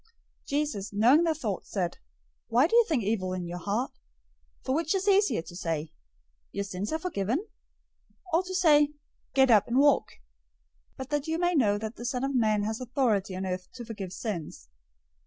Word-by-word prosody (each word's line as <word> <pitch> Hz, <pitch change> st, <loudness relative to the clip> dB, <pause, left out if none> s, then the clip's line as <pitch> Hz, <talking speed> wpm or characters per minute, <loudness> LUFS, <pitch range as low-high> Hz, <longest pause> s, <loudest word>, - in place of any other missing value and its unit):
009:004 -, -, -35 dB, 0.4 s
Jesus, 280 Hz, -9 st, -2 dB
knowing 240 Hz, +10 st, +5 dB
their 330 Hz, -1 st, +2 dB
thoughts, 215 Hz, -, -4 dB
said, 180 Hz, -4 st, -2 dB, 0.5 s
"Why 240 Hz, +4 st, +4 dB
do 360 Hz, -, +1 dB
you 475 Hz, -, +8 dB
think 295 Hz, -, 0 dB
evil 195 Hz, -3 st, -1 dB
in 180 Hz, -1 st, -3 dB
your 175 Hz, +1 st, -5 dB
hearts? 210 Hz, +8 st, -2 dB, 0.7 s
009:005 -, -, -31 dB
For 260 Hz, -, 0 dB
which 325 Hz, +5 st, 0 dB
is 385 Hz, +1 st, -1 dB
easier, 400 Hz, -, +3 dB
to 175 Hz, -, -11 dB
say, 165 Hz, -3 st, -3 dB, 0.6 s
'Your 200 Hz, -, -2 dB
sins 195 Hz, +1 st, -4 dB
are 315 Hz, -, +1 dB
forgiven;' 310 Hz, -, -2 dB, 0.9 s
or 335 Hz, -, +5 dB
to 375 Hz, 0 st, -6 dB
say, 300 Hz, -5 st, +5 dB, 0.5 s
'Get 265 Hz, -2 st, +5 dB
up, 210 Hz, -3 st, +5 dB
and 235 Hz, -, 0 dB
walk?' 285 Hz, +1 st, +4 dB, 0.8 s
009:006 -, -, -40 dB
But 265 Hz, -1 st, -7 dB
that 295 Hz, 0 st, -1 dB
you 320 Hz, 0 st, 0 dB
may 350 Hz, +1 st, +1 dB
know 215 Hz, -10 st, +3 dB
that 220 Hz, +2 st, -6 dB
the 240 Hz, -, -7 dB
Son 250 Hz, +1 st, -2 dB
of 275 Hz, 0 st, -1 dB
Man 215 Hz, -4 st, +2 dB
has 220 Hz, +3 st, -3 dB
authority 230 Hz, -6 st, 0 dB
on 190 Hz, +1 st, -3 dB
earth 185 Hz, 0 st, -4 dB
to 240 Hz, -2 st, -8 dB
forgive 205 Hz, -5 st, -6 dB
sins..." 185 Hz, -, -5 dB
235 Hz, 195 wpm, -28 LUFS, 200-295 Hz, 0.9 s, you